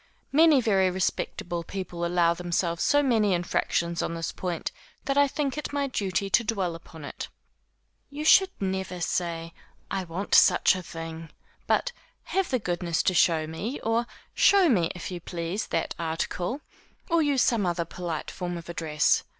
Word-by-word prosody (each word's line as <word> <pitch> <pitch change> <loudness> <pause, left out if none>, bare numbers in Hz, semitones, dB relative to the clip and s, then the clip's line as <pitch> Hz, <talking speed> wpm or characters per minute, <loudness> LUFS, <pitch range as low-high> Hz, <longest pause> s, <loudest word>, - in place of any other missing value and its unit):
Many 310 -2 +6
very 195 -5 +3
respectable 175 -1 -2
people 180 -1 -5
allow 170 -1 +3
themselves 170 -1 -1
so 290 0 +4
many 220 -7 +3
infractions 170 0 -1
on 170 - -2
this 165 0 -3
point, 175 -3 -4 0.3
that 275 - 0
I 285 0 +5
think 285 0 -2
it 300 - -5
my 285 -1 0
duty 200 -7 -1
to 235 +4 +3
dwell 195 -6 -1
upon 165 -2 -11
it. - - -6 0.8
You 295 +2 -5
should 380 +4 +7
never 190 -2 -3
say, 165 -1 -2 0.4
I 190 -1 -2
want 175 +4 -5
such - - +6
a 185 - -4
thing, 165 -1 -8 0.4
but, - - +2 0.3
have 385 -1 -1
the 255 - +2
goodness 175 -5 -1
to 185 - +2
show 165 -2 +3
me, 195 - -5
or 230 +1 0 0.3
show 390 -2 +5
me, 180 -10 +3
if 180 +1 -6
you 180 - -4
please, 170 +4 -4
that - - -1
article, 175 - -2 0.5
or 335 -2 +3
use 285 -4 +2
some 220 -6 +2
other 170 -1 -1
polite 170 -2 -5
form 175 -1 -4
of 170 0 -10
address. 155 -3 +1
180 Hz, 165 wpm, -27 LUFS, 170-235 Hz, 0.8 s, should